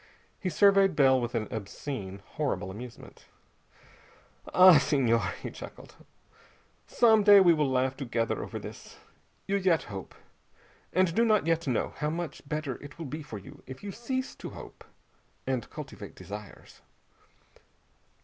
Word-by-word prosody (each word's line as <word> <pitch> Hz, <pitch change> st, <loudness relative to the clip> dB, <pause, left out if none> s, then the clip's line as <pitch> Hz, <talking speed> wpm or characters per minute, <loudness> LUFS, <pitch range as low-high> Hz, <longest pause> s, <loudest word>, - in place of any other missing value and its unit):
He 185 Hz, -, -2 dB
surveyed 195 Hz, +1 st, +4 dB
Bell 135 Hz, -3 st, +5 dB
with 120 Hz, +1 st, -3 dB
an 110 Hz, -2 st, -1 dB
obscene, 100 Hz, -2 st, -6 dB
horrible 140 Hz, -11 st, -3 dB
amusement. 120 Hz, +4 st, -11 dB, 1.2 s
"Ah, 180 Hz, -4 st, +8 dB
Senhor," 135 Hz, -5 st, +2 dB, 0.2 s
he -, -, -4 dB
chuckled, -, -, -11 dB, 0.9 s
"some 225 Hz, -3 st, +5 dB
day 205 Hz, -1 st, +9 dB
we 175 Hz, -3 st, +6 dB
will 150 Hz, -3 st, +1 dB
laugh 130 Hz, 0 st, +1 dB
together 120 Hz, -4 st, -2 dB
over -, -, -6 dB
this! -, -, -10 dB, 0.5 s
You 200 Hz, -, 0 dB
yet 180 Hz, -5 st, +2 dB
hope, 95 Hz, -3 st, -8 dB, 0.8 s
and 185 Hz, -1 st, +2 dB
do 230 Hz, -, +3 dB
not 215 Hz, -5 st, +3 dB
yet 165 Hz, -1 st, 0 dB
know 125 Hz, -4 st, 0 dB
how 150 Hz, -, -1 dB
much 165 Hz, -1 st, -4 dB
better 150 Hz, -4 st, -3 dB
it 145 Hz, 0 st, -11 dB
will 165 Hz, -, -6 dB
be 150 Hz, +3 st, -5 dB
for 145 Hz, -8 st, -8 dB
you 100 Hz, -, -13 dB
if 130 Hz, +5 st, -10 dB
you 205 Hz, -, -5 dB
cease 260 Hz, +4 st, -3 dB
to -, -, -7 dB
hope, -, -, -11 dB, 0.6 s
and 130 Hz, -3 st, -2 dB
cultivate -, -, -9 dB
desires! 105 Hz, -1 st, -10 dB
150 Hz, 145 wpm, -29 LUFS, 120-185 Hz, 1.2 s, day